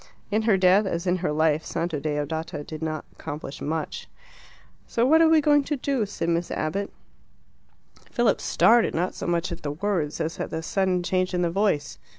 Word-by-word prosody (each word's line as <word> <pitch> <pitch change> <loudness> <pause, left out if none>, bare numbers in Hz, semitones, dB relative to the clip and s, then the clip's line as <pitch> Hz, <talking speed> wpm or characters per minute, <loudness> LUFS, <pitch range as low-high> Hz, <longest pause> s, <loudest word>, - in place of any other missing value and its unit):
In 215 +2 +2
her 195 - +5
death, 190 +2 +4
as 170 -1 -2
in 180 0 +2
her 180 -3 -1
life, 155 0 +2
Santa 165 -3 -2
Deodata 150 +1 -3
did 155 +1 -8
not 155 -1 -3
accomplish 145 -2 -7
much. 155 +1 -3 0.8
"So 235 - +1
what 320 +5 +5
are 325 - +6
you 310 - +5
going 290 -1 +4
to 295 - -1
do?" 255 -5 -1
said 170 -4 -3
Miss 170 +1 0
Abbott. 195 +6 -2 1.2
Philip 240 -4 +1
started, 235 0 +4
not 175 +3 0
so - - -6
much 170 0 0
at 170 - -6
the 145 -1 -3
words 170 -3 -2
as 160 +2 -3
at - - -3
the 160 0 -4
sudden 185 0 0
change 185 0 0
in 175 - +1
the 170 - 0
voice. 195 -6 0
175 Hz, 190 wpm, -25 LUFS, 155-200 Hz, 1.2 s, are